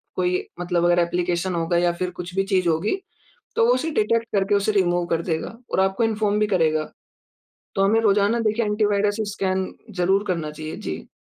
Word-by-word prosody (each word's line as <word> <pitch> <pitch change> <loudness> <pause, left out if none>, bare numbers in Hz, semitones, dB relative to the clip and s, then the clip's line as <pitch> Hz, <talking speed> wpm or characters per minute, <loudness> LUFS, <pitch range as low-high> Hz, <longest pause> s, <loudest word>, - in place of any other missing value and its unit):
कोई 180 0 0
मतलब 175 -1 0
अगर 175 0 +4
एप्लीकेशन 175 +1 0
होगा 170 +1 0
या 175 0 +3
फिर 180 +1 -3
कुछ 180 +1 -8
भी 195 - +2
चीज़ 185 -2 +3
होगी 165 - 0 0.6
तो 230 - +4
वो 240 - +5
उसे 260 +6 -1
डिटेक्ट 230 -3 +1
करके 200 +1 +2
उसे 200 +1 +2
रिमूव 175 -3 +2
कर 165 -1 0
देगा, 175 +5 -3
और - - +1
आपको 190 +3 +2
इन्फॉर्म 210 -2 +1
भी 210 - +2
करेगा। 155 -5 +1 0.8
तो 195 - +1
हमें 220 +3 +3
रोज़ाना 210 +1 +3
देखिए 225 +1 +1
एंटी 210 +1 +1
वायरस 205 0 +1 0.2
स्कैन 190 -1 -1 0.3
ज़रूर 195 +3 +2
करना 165 -4 -1
चाहिए। 155 +1 -7
जी। 75 - -6
190 Hz, 195 wpm, -23 LUFS, 175-210 Hz, 0.8 s, वो